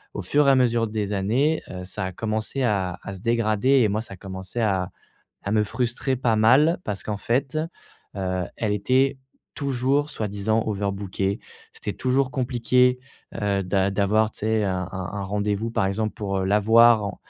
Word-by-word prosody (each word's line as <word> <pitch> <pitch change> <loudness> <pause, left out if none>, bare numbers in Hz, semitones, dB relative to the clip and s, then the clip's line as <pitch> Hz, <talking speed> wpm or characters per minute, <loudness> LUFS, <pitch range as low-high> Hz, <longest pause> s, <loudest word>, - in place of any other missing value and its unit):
au - - -3
fur 145 0 +2
et - - +7
à 135 - +5
mesure 120 -3 +2
des 105 -1 -3
années, 120 +11 +1
heu, 90 0 -6
ça 95 0 -5
a 95 - -4
commencé 110 +6 -2
à 95 -6 0
à 100 - -6
se - - -10
dégrader 115 0 +1
et 110 - +4
moi 110 +2 -1
ça 100 -4 -9
a - - -20
commencé 95 +3 -7
à 95 -4 0 0.5
à 100 - -2
me 105 -1 +3
frustrer 125 +4 -1
pas 120 -3 +1
mal 135 +10 +5
parce 100 -2 -4
qu'en 105 - -2
fait, 130 +7 -1 0.6
heu, 95 -1 -1
elle 110 -2 -1
était 130 +6 +2 0.4
toujours 140 +1 0
soi-disant 110 0 -1
overbookée. 100 -1 -2 0.4
C'était 105 - -4
toujours 130 +1 +1
compliqué, 125 -1 +2 0.4
heu, 100 -2 0
d'a 95 +1 +1
d'avoir, 105 +2 +2
tu - - -15
sais? 110 0 +1
Un 95 -2 -2
un 95 -1 -5
un 100 - -4
rendez-vous, 105 +3 -1
par 95 - 0
exemple, 110 +2 -2
pour 100 -3 -2
la 100 +2 +3
voir, 110 -1 +5
110 Hz, 180 wpm, -24 LUFS, 100-125 Hz, 0.6 s, et